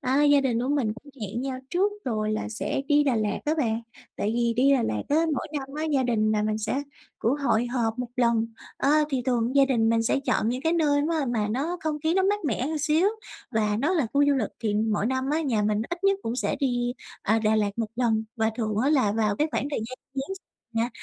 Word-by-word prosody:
À, 275 Hz, +2 st, +2 dB
gia 285 Hz, -1 st, +6 dB
đình 245 Hz, -4 st, 0 dB
của 255 Hz, -, -2 dB
mình 275 Hz, -7 st, +1 dB
cũng 285 Hz, +5 st, -14 dB
hẹn 210 Hz, +4 st, -3 dB
nhau 260 Hz, -1 st, -3 dB
trước 390 Hz, +4 st, +2 dB
rồi 215 Hz, -3 st, -1 dB
là 215 Hz, -, -2 dB
sẽ 220 Hz, +5 st, -2 dB
đi 290 Hz, 0 st, +4 dB
Đà 260 Hz, -4 st, +2 dB
Lạt 210 Hz, -1 st, 0 dB
á 300 Hz, -, +1 dB
bạn. 230 Hz, -5 st, 0 dB, 0.4 s
Tại 210 Hz, -, -1 dB
vì 235 Hz, 0 st, +1 dB
đi 275 Hz, +3 st, +5 dB
Đà 260 Hz, -, +3 dB
Lạt 105 Hz, -, -1 dB
á, 290 Hz, -, +2 dB, 0.2 s
mỗi 260 Hz, -, -3 dB
năm 270 Hz, -1 st, -7 dB
á, 310 Hz, -, -2 dB
gia 270 Hz, -, +3 dB
đình 220 Hz, -3 st, +1 dB
nhà 210 Hz, -1 st, +1 dB
mình 215 Hz, 0 st, 0 dB
sẽ 230 Hz, +6 st, -1 dB, 0.4 s
cũng 235 Hz, +5 st, +1 dB
hội 245 Hz, -4 st, +1 dB
họp 240 Hz, -2 st, -1 dB
một 250 Hz, -1 st, -3 dB
lần. 235 Hz, -2 st, +2 dB, 0.3 s
A, 300 Hz, +2 st, +3 dB
thì 265 Hz, -3 st, 0 dB
thường 245 Hz, 0 st, 0 dB
gia 275 Hz, -, +7 dB
đình 235 Hz, -5 st, +2 dB
mình 225 Hz, 0 st, +3 dB
sẽ 250 Hz, -, +1 dB
chọn 225 Hz, -, 0 dB
những 250 Hz, +3 st, -2 dB
cái 325 Hz, +1 st, +2 dB
nơi 295 Hz, -4 st, +3 dB, 0.2 s
á -, -, 0 dB
mà 220 Hz, -3 st, 0 dB
nó 295 Hz, +9 st, -1 dB
không 310 Hz, -1 st, -2 dB
khí 320 Hz, +2 st, +2 dB
nó 380 Hz, -, +3 dB
mát 410 Hz, 0 st, +1 dB
mẻ 255 Hz, -2 st, 0 dB
một 315 Hz, +1 st, -2 dB
xíu 315 Hz, +5 st, +3 dB, 0.4 s
và 215 Hz, -2 st, +1 dB
nó 295 Hz, +9 st, +1 dB
là 310 Hz, -8 st, +2 dB
khu 285 Hz, 0 st, +4 dB
du 285 Hz, -, +4 dB
lịch. 235 Hz, -6 st, -1 dB
Thì 215 Hz, -2 st, 0 dB
mỗi 215 Hz, -1 st, +1 dB
năm 260 Hz, +2 st, -1 dB
á, 315 Hz, -, +1 dB
nhà 245 Hz, -9 st, 0 dB
mình 210 Hz, +1 st, +1 dB
ít 345 Hz, +2 st, -5 dB
nhất 395 Hz, 0 st, +4 dB
cũng 230 Hz, +2 st, -3 dB
sẽ -, -, -1 dB
đi, 245 Hz, -3 st, 0 dB, 0.3 s
à, 220 Hz, +2 st, +2 dB
Đà 220 Hz, 0 st, +2 dB
Lạt 205 Hz, -1 st, +1 dB
một 225 Hz, -2 st, -1 dB
lần 225 Hz, -3 st, +1 dB
và 220 Hz, -1 st, +1 dB
thường 215 Hz, -3 st, -1 dB
á 265 Hz, +6 st, +2 dB
là 255 Hz, -9 st, +3 dB
vào 210 Hz, -2 st, +1 dB
cái 300 Hz, -, +1 dB
khoảng 280 Hz, -, -1 dB
thời -, -, -1 dB
gian 230 Hz, +3 st, -6 dB, 0.2 s
Giáng 275 Hz, +8 st, -3 dB
sinh 380 Hz, -, -15 dB, 0.3 s
nè, 230 Hz, +1 st, +1 dB
250 Hz, 260 wpm, -26 LUFS, 220-285 Hz, 0.4 s, gia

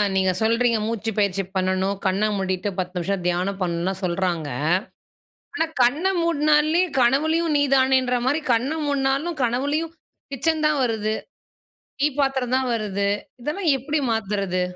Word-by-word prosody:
நீங்க 190 Hz, -1 st, +3 dB
சொல்றீங்க 230 Hz, +1 st, +2 dB
மூச்சு 225 Hz, 0 st, -2 dB
பயிற்சி 195 Hz, -1 st, +1 dB
பண்ணணும். 190 Hz, +1 st, 0 dB
கண்ண 195 Hz, +3 st, +2 dB
மூடிட்டு 190 Hz, +1 st, -1 dB
10 180 Hz, 0 st, -3 dB
நிமிசம் 180 Hz, 0 st, -2 dB
தியானம் 185 Hz, +3 st, -1 dB
பண்ணணும்னுலா 175 Hz, +1 st, -1 dB
சொல்றாங்க. 175 Hz, -3 st, -1 dB, 1.1 s
ஆனா 325 Hz, -, +1 dB, 0.2 s
கண்ண 285 Hz, +9 st, +2 dB, 0.2 s
மூட்னாலே 305 Hz, +1 st, +3 dB, 0.2 s
கனவிலயும் 310 Hz, +6 st, +2 dB
நீ 285 Hz, -, +3 dB
தானேன்ற 260 Hz, -1 st, +3 dB
மாதிரி 290 Hz, +5 st, +1 dB
கண்ண 250 Hz, +6 st, 0 dB
மூடினாலும், 280 Hz, +3 st, 0 dB
கனவிலும் 285 Hz, +7 st, -1 dB, 0.4 s
கிச்சன் 310 Hz, +3 st, 0 dB
தான் 300 Hz, -2 st, +1 dB
வருது. 220 Hz, -2 st, -1 dB, 0.9 s
டீ 290 Hz, -, +4 dB
பாத்திரம் 265 Hz, -2 st, +1 dB
தான் 260 Hz, -1 st, -1 dB
வருது. 200 Hz, -2 st, -1 dB, 0.3 s
இதெல்லாம் 310 Hz, +5 st, -1 dB
எப்படி 295 Hz, +4 st, -2 dB
மாத்தறது? 200 Hz, -4 st, -1 dB
235 Hz, 130 wpm, -23 LUFS, 195-285 Hz, 1.1 s, டீ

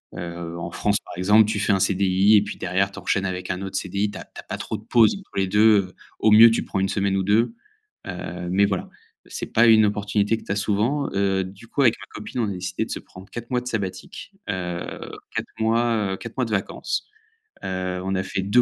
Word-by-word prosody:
heu -, -, -8 dB
heu, 85 Hz, -1 st, -6 dB
en 85 Hz, 0 st, -5 dB
France, 105 Hz, +2 st, +1 dB
par -, -, -10 dB
exemple, 105 Hz, +4 st, +5 dB
tu 105 Hz, -1 st, -1 dB
fais 100 Hz, -, +1 dB
un 95 Hz, -, +3 dB
CDI 95 Hz, +1 st, +3 dB
et 105 Hz, -, +6 dB
puis -, -, -7 dB
derrière, 95 Hz, +2 st, 0 dB
tu 100 Hz, -, -13 dB
enchaînes 95 Hz, -1 st, 0 dB
avec 90 Hz, -1 st, -4 dB
un 90 Hz, +1 st, -4 dB
autre 95 Hz, 0 st, -3 dB
CDI, 100 Hz, +3 st, -1 dB
tu -, -, -8 dB
as -, -, -7 dB
tu -, -, -13 dB
as -, -, -8 dB
pas -, -, -5 dB
trop -, -, -4 dB
de -, -, -8 dB
pause 115 Hz, -2 st, +4 dB
entre 195 Hz, -, -18 dB
les 95 Hz, -1 st, +2 dB
2 105 Hz, +3 st, +5 dB, 0.2 s
heu, 90 Hz, -, -19 dB, 0.2 s
au 110 Hz, -, +3 dB
mieux, 115 Hz, +2 st, +9 dB
tu 115 Hz, -, 0 dB
prends 95 Hz, -, -2 dB
1 95 Hz, -, +1 dB
semaine 100 Hz, -1 st, 0 dB
ou 95 Hz, -, +1 dB
2 110 Hz, -, +2 dB, 0.5 s
heu, 90 Hz, -1 st, -5 dB
mais 100 Hz, +2 st, +4 dB
voilà, 95 Hz, -2 st, -2 dB, 0.4 s
c'est -, -, -6 dB
pas 115 Hz, +1 st, +5 dB
une 110 Hz, -1 st, +7 dB
opportunité 105 Hz, +1 st, +1 dB
que -, -, -12 dB
tu -, -, -5 dB
as 100 Hz, -, +1 dB
souvent, 110 Hz, +8 st, 0 dB
heu, 95 Hz, -1 st, +1 dB
du 95 Hz, +4 st, -11 dB
coup, 140 Hz, -, -1 dB
avec 120 Hz, -, +5 dB
ma -, -, -11 dB
copine, 105 Hz, +3 st, -6 dB
on 110 Hz, -, 0 dB
a -, -, -3 dB
décidé 90 Hz, 0 st, -3 dB
de -, -, -14 dB
se -, -, -2 dB
prendre 95 Hz, +2 st, -14 dB
4 120 Hz, +1 st, -8 dB
mois 125 Hz, -1 st, +1 dB
de 125 Hz, -, -9 dB
sabbatique, 100 Hz, -6 st, -5 dB, 0.2 s
heu, 90 Hz, -2 st, -4 dB, 0.2 s
4 -, -, -1 dB
mois, 110 Hz, -3 st, +1 dB
heu, 95 Hz, -, -4 dB
4 115 Hz, -, -9 dB
mois 125 Hz, -, +1 dB
de 110 Hz, -, -6 dB
vacances, 100 Hz, -2 st, -2 dB, 0.6 s
heu. 95 Hz, -1 st, -3 dB
On 95 Hz, +1 st, -2 dB
a 95 Hz, -, 0 dB
fait 95 Hz, -, -3 dB
2 100 Hz, +6 st, +4 dB
100 Hz, 255 wpm, -23 LUFS, 95-110 Hz, 0.6 s, mieux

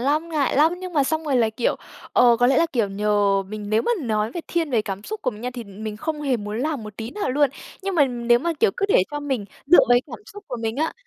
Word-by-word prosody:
lắm, 300 Hz, +6 st, 0 dB
ngại 295 Hz, -5 st, 0 dB
lắm. 315 Hz, +4 st, +5 dB
Nhưng 370 Hz, -1 st, -7 dB
mà 285 Hz, -4 st, +2 dB
xong 315 Hz, +2 st, -1 dB
rồi 275 Hz, -4 st, +1 dB
là, 225 Hz, -2 st, +3 dB
kiểu, 230 Hz, +2 st, -1 dB, 0.4 s
ờ 240 Hz, -1 st, +5 dB
có 245 Hz, +1 st, +3 dB
lẽ 265 Hz, +1 st, +3 dB
là, 335 Hz, -, +3 dB
kiểu, 230 Hz, -5 st, +1 dB
nhờ 200 Hz, -1 st, +1 dB
mình 210 Hz, +1 st, -7 dB
nếu 220 Hz, +1 st, +2 dB
mà 480 Hz, -, +1 dB
nói 215 Hz, -2 st, 0 dB
về 345 Hz, -, -4 dB
thiên 330 Hz, -4 st, -1 dB
về 230 Hz, -4 st, +2 dB
cảm 195 Hz, -1 st, -5 dB
xúc 435 Hz, -1 st, -6 dB
của 255 Hz, -, +1 dB
mình 210 Hz, -1 st, -11 dB
nha 250 Hz, -, -3 dB
thì 240 Hz, -2 st, -6 dB
mình 210 Hz, +2 st, -7 dB
không 310 Hz, +4 st, -4 dB
hề 265 Hz, -4 st, +1 dB
muốn 210 Hz, +1 st, -5 dB
làm 290 Hz, -2 st, -2 dB
một 215 Hz, -1 st, -10 dB
tí 225 Hz, +2 st, -5 dB
nào 410 Hz, -10 st, -2 dB
luôn. 285 Hz, 0 st, +2 dB, 0.3 s
Nhưng 390 Hz, 0 st, -2 dB
mà 295 Hz, -5 st, +5 dB
nếu 240 Hz, -2 st, +2 dB
mà, 335 Hz, +6 st, -1 dB
kiểu, 450 Hz, -, +5 dB
cứ 400 Hz, -, 0 dB
để 185 Hz, -, +5 dB
cho 295 Hz, 0 st, -4 dB
mình 265 Hz, -7 st, -2 dB, 0.2 s
dựa 350 Hz, -, +7 dB
vào -, -, +6 dB
cái 245 Hz, -, +6 dB
cảm -, -, -8 dB
xúc 410 Hz, +1 st, -11 dB
của 245 Hz, -, -4 dB
mình 225 Hz, +2 st, -2 dB
á 315 Hz, +2 st, 0 dB
250 Hz, 295 wpm, -23 LUFS, 215-310 Hz, 0.4 s, dựa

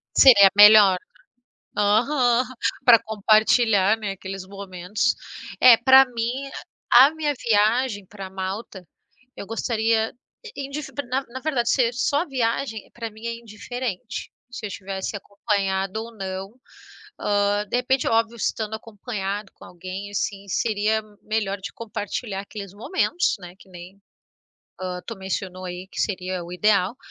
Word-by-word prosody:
Seria 200 Hz, -7 st, +8 dB
melhor, 205 Hz, -2 st, +8 dB, 0.6 s
né? 210 Hz, -, -5 dB
Aham. 245 Hz, +4 st, +3 dB, 0.4 s
Para 235 Hz, -2 st, +8 dB
compartilhar, 215 Hz, -1 st, +3 dB
né, 210 Hz, -3 st, -3 dB
aqueles 195 Hz, 0 st, -7 dB
momentos. 195 Hz, 0 st, -2 dB, 0.5 s
É 250 Hz, -2 st, +9 dB
para 265 Hz, +3 st, +7 dB
mim 250 Hz, +3 st, -4 dB, 0.4 s
a 265 Hz, +6 st, +8 dB
minha 300 Hz, -2 st, -1 dB
viagem 220 Hz, -1 st, +1 dB
para 195 Hz, -1 st, -9 dB
Malta. 190 Hz, 0 st, -6 dB, 0.5 s
Eu -, -, -7 dB
gostaria 225 Hz, 0 st, 0 dB, 0.4 s
indif 280 Hz, +1 st, -5 dB, 0.2 s
na 265 Hz, +2 st, 0 dB
na 255 Hz, +2 st, -7 dB
verdade, 260 Hz, -5 st, 0 dB
ser 240 Hz, -3 st, +2 dB
só 285 Hz, +5 st, +1 dB
a -, -, -6 dB
viagem 230 Hz, -4 st, -2 dB
para 230 Hz, -1 st, -6 dB
mim 220 Hz, +2 st, -10 dB
é 235 Hz, -, -2 dB
indiferente. 230 Hz, 0 st, -6 dB, 0.2 s
Se 250 Hz, -, -6 dB
eu -, -, -7 dB
tivesse 195 Hz, +1 st, -5 dB
acompanhado 200 Hz, 0 st, -2 dB
ou 230 Hz, 0 st, -12 dB
não. 190 Hz, +1 st, -6 dB, 0.7 s
Hã, 205 Hz, 0 st, +1 dB
de -, -, 0 dB
repente, 255 Hz, +2 st, +1 dB
é -, -, +1 dB
óbvio, 225 Hz, +1 st, +1 dB
estando 220 Hz, -1 st, -2 dB
acompanhado 210 Hz, -2 st, -5 dB
com -, -, -15 dB
alguém, 185 Hz, +3 st, -8 dB
assim, 200 Hz, 0 st, -3 dB
seria 215 Hz, +2 st, 0 dB, 0.2 s
melhor 210 Hz, -2 st, -2 dB
de 190 Hz, -, -7 dB
compartilhar 210 Hz, -2 st, -5 dB
aqueles 200 Hz, -1 st, -9 dB
momentos, 350 Hz, -, 0 dB
né. 175 Hz, -1 st, -10 dB
Que -, -, -18 dB
nem, 180 Hz, +1 st, -12 dB, 0.8 s
hã, 180 Hz, -1 st, -4 dB
tu 230 Hz, -, -6 dB
mencionou 190 Hz, -1 st, -5 dB
aí 180 Hz, +1 st, -7 dB
que -, -, -3 dB
seria 185 Hz, -3 st, -3 dB
o 170 Hz, -, -10 dB
ideal, 200 Hz, +2 st, +2 dB
210 Hz, 140 wpm, -23 LUFS, 195-235 Hz, 0.8 s, É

